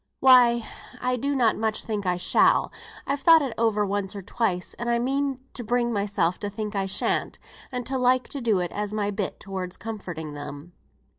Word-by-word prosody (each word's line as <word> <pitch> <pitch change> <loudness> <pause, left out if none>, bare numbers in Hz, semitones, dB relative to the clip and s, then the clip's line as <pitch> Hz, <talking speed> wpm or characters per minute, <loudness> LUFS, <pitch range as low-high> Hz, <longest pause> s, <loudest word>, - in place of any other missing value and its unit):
"Why 240 -3 +6 0.3
I 250 0 0
do 280 +4 -1
not 240 -4 +3
much 220 0 -1
think 210 -3 -3
I 180 -1 +1
shall. 180 - +3 0.3
I've 280 +1 -1
thought 325 +2 +6
it 260 -4 -3
over 220 -2 +2
once 200 0 -2
or 200 - -6
twice, 185 -3 -1
and 235 0 -2
I 235 - +3
mean 270 +2 -1
to 245 - -5
bring 240 +1 0
myself 200 -4 0
to 205 - -3
think 210 +1 -5
I 195 -1 0
shan't, 195 - -1 0.3
and 250 -2 -4
to 265 +1 -2
like 255 0 +3
to 280 - -5
do 225 -4 +2
it 180 -2 -1
as 210 0 -3
my 205 -1 -1
bit 200 -1 -3
towards 190 -2 -5
comforting 175 -9 -6
them. 145 +3 -8
215 Hz, 200 wpm, -25 LUFS, 195-245 Hz, 0.3 s, Why